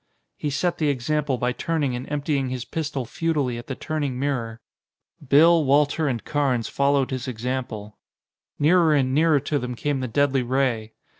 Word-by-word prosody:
He 150 - -3
set 170 +5 -1
the 155 - +1
example 140 +1 0
by 125 +1 0
turning 145 0 -1
and 125 +1 -6
emptying 145 -2 -1
his 125 -1 -4
pistol 145 -3 -3
futilely 145 -4 -1
at 120 - -11
the 130 - -4
turning 145 -4 -3
mirror. 125 -5 -2 0.6
Bill, 160 +4 +5
Walter 145 +3 +2
and 120 -6 -2
Carnes 135 -6 0
followed 140 -1 +1
his 130 -1 -4
example. 120 -3 -4 0.6
Nearer 160 0 +4
and 130 -2 +1
nearer 155 0 +4
to 145 +2 -1
them 125 -1 -4
came 145 +2 -1
the 130 - -2
deadly 135 +2 +2
ray. 120 -3 -1
140 Hz, 165 wpm, -24 LUFS, 125-150 Hz, 0.6 s, Bill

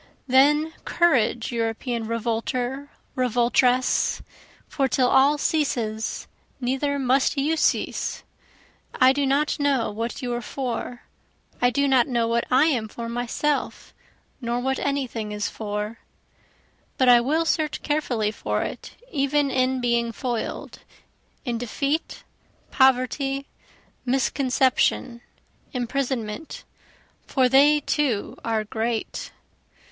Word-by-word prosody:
Then 295 +4 +4
courage 255 -9 +2
European 230 0 -2
revolter, 245 +4 -2 0.3
revoltress! 250 +1 +2 0.4
For 270 -2 0
till 255 -1 +2
all 275 +3 +4
ceases 235 -9 -1 0.3
neither 270 +3 -1
must 265 +2 +2
you 295 +4 +1
cease. 315 - 0 0.7
I 260 +1 +5
do 280 0 0
not 285 +3 +1
know 275 -6 +1
what 230 +5 -4
you 245 -1 -2
are 240 - -2
for, 245 0 -5 0.6
(I 245 - +5
do 280 +3 +1
not 260 -3 +4
know 235 -3 0
what 235 0 0
I 260 +4 +5
am 250 -9 +1
for 230 +2 -7
myself, 245 +5 -2 0.5
nor 240 0 -1
what 265 +1 -1
any 280 -1 0
thing 220 -3 -5
is 210 -1 -2
for,) 210 +1 -5 1.0
But 260 - +3
I 240 -1 +7
will 310 +7 +1
search 310 -2 -1
carefully 250 -8 0
for - - -2
it - - -7 0.2
even 280 -1 +1
in 255 0 +1
being 235 -1 +1
foil'd, 240 0 -4 0.7
In 240 -3 -2
defeat, 280 +6 -2 0.5
poverty, 265 +1 +2 0.6
misconception, 260 -1 +1 0.5
imprisonment 250 0 -3 0.6
for 260 -1 +3
they 290 +4 +5
too 270 -8 -1
are 225 -2 0
great. 220 +2 -3
255 Hz, 115 wpm, -24 LUFS, 235-275 Hz, 1.0 s, I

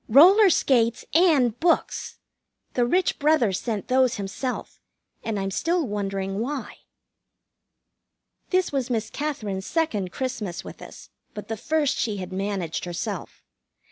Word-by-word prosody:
Roller 375 - +8
skates 235 -8 +2
and 285 - +4
books! 340 0 0 0.6
The 245 -1 +2
rich 360 +8 +1
brother 290 -9 +3
sent 215 +2 -3
those 255 -1 +3
himself, 205 +6 -5 0.4
and 220 -3 -2
I'm 195 0 -2
still 335 - 0
wondering 195 -2 -3
why. 270 +4 -4 1.7
This 370 -1 +1
was 270 -3 -1
Miss 225 -3 -1
Katherine's 215 -11 -3
second 220 - -1
Christmas 225 -9 -4
with - - -10
us, - - -12 0.2
but 210 0 -8
the 225 - -1
first 300 +5 0
she 215 -3 -1
had 185 -1 -6
managed 190 -4 -2
herself. 175 -1 -5
235 Hz, 130 wpm, -25 LUFS, 200-295 Hz, 1.7 s, Roller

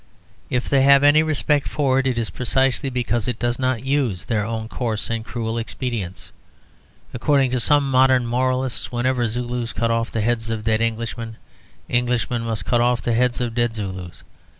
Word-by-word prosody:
If 125 0 -1
they 140 -2 +3
have 140 +1 +6
any 145 +2 +6
respect 150 -2 +1
for 135 -3 +1
it, 135 - 0
it 125 -2 0
is 115 -2 -2
precisely 130 +2 +1
because 120 -2 -1
it 125 -3 -2
does 120 +1 -1
not 130 -1 -1
use 130 - 0
their 110 -3 0
own 110 +1 -4
coarse 115 -2 -3
and 115 -1 -2
cruel 115 -1 -3
expedients. 115 -5 -5 0.8
According 135 +1 +2
to 125 - 0
some 140 +2 +2
modern 130 -1 +4
moralists 130 +1 -1
whenever 125 0 0
Zulus 120 +1 -3
cut 115 0 0
off 115 0 0
the 115 - -2
heads 115 0 0
of 110 -1 -3
dead 110 0 +1
Englishmen, 115 0 -3 0.5
Englishmen 120 0 0
must 115 -1 -3
cut 120 -1 +2
off 120 -2 +1
the 120 - 0
heads 125 +1 +1
of 120 -2 -2
dead 120 -1 0
Zulus. 95 -4 -6
120 Hz, 180 wpm, -22 LUFS, 115-130 Hz, 0.8 s, have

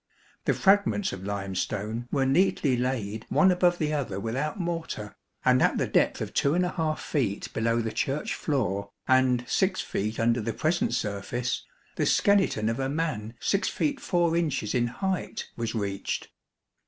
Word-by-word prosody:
The - - +2
fragments 200 0 +3
of 95 0 -7
limestone 100 +3 -3
were 135 -2 +2
neatly 140 -2 +3
laid 115 -4 -2
one 190 -1 +5
above 180 -1 +3
the 155 -2 -1
other 120 -10 -2
without 135 - -2
mortar, 165 - -4 0.3
and - - +5
at - - +3
the - - +1
depth - - +2
of - - -4
2 145 +5 +2 0.4
feet 110 -9 -2
below 115 +1 +1
the 110 -1 -2
Church 135 +5 -1
floor 100 - -1 0.2
and 130 -2 +3
6 190 +6 +1
feet 110 +3 -3
under 115 +1 +2
the 115 +1 -2
present 160 -6 0
surface 115 +4 -2 0.3
the - - +1
skeleton 195 - +3
of 115 +3 -1
a 135 0 0
man 140 -8 -2
6 200 +1 +1
feet 285 -2 -1
4 170 -2 +1
inches 150 -10 0
in 120 -1 +2
height 185 +10 -3
was 115 -1 -3
reached. 100 -3 -3
125 Hz, 155 wpm, -27 LUFS, 110-165 Hz, 0.4 s, one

